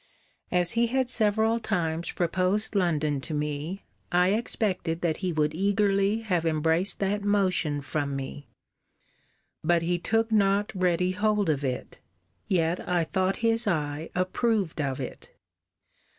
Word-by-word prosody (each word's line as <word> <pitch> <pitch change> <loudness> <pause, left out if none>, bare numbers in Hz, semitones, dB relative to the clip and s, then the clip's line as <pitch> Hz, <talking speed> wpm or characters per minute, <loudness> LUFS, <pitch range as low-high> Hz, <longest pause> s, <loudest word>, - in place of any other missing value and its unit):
As 180 -1 +3
he 235 0 +2
had 260 +1 0
several 220 +1 +2
times 170 -7 -1
proposed 185 +5 0
London 155 -7 +1
to 155 +3 -5
me, 150 +6 -3 0.3
I 180 +1 +4
expected 190 -6 0
that 165 -3 0
he 185 -2 -2
would 155 -1 0
eagerly 200 +3 +1
have 180 -7 0
embraced 165 +3 +1
that 200 +1 0
motion 185 -8 +1
from 145 -1 -2
me. 135 +1 -6 1.2
But 170 +1 +2
he 175 +1 0
took 225 +4 0
not 200 -1 +2
ready 180 -1 +1
hold 205 -2 +1
of 145 -1 -2
it: 130 -2 -4 0.5
yet 170 -1 +1
I 175 -1 +2
thought 185 +3 0
his 225 0 +2
eye 150 -3 -1
approved 185 -2 0
of 135 -2 -2
it. - - -7
180 Hz, 135 wpm, -27 LUFS, 160-205 Hz, 1.2 s, I